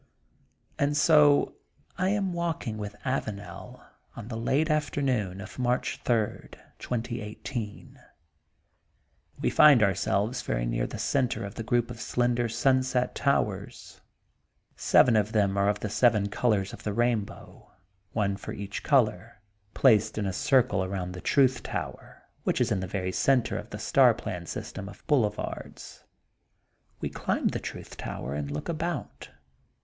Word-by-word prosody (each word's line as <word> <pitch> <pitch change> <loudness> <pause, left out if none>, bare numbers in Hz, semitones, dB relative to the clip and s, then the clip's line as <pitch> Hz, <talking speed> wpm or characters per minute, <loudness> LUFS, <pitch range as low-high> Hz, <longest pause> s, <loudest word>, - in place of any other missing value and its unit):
And 145 +1 +1
so 145 -1 +5 0.4
I 185 +1 0
am 195 -2 0
walking 165 -10 -3
with 105 0 -6
Avanel, 110 -6 -5 0.3
on 115 -1 -8
the 115 - -4
late 140 +8 +1
afternoon 130 -10 0
of 100 +5 -9
March 125 0 0
third, 115 -4 -1 0.2
2018, 115 -1 -5 1.4
We - - 0
find 145 -7 +7
ourselves 100 +4 +1
very - - -2
near - - -1
the - - -7
center 115 -4 0
of 100 - -7
the - - -6
group 120 +1 0
of 115 - -8
slender 120 -1 0
Sunset 130 +1 +1
Towers, 105 -8 -2 0.7
Seven 120 -3 +4
of 105 0 +1
them 100 -3 +2
are 100 0 +2
of 105 - -1
the 110 - -2
seven 105 -2 +3
colors 100 -3 0
of - - -9
the 105 - -3
rainbow, 115 -2 -2 0.4
one 100 -2 0
for - - -7
each 100 0 -5
color, 115 -4 +1 0.4
placed 110 -4 +4
in 105 - -1
a 95 - -2
circle 130 - +2
around 95 -1 -3
the 90 0 -8
Truth 130 -2 +3
Tower, - - -6 0.2
which - - 0
is - - +1
in - - +1
the 95 - -4
very 95 0 -2
center 125 +4 +2
of - - -5
the - - -6
star - - +4
plan 85 -1 -6
system 100 +4 -6
of 95 - -15
boulevards. 125 -9 -2 1.0
We - - -2
climb - - 0
the - - -3
Truth - - -8
Tower 70 - -5
and 70 -1 -3
look 75 +1 -5
about. 165 -2 -4
115 Hz, 145 wpm, -28 LUFS, 100-130 Hz, 1.4 s, find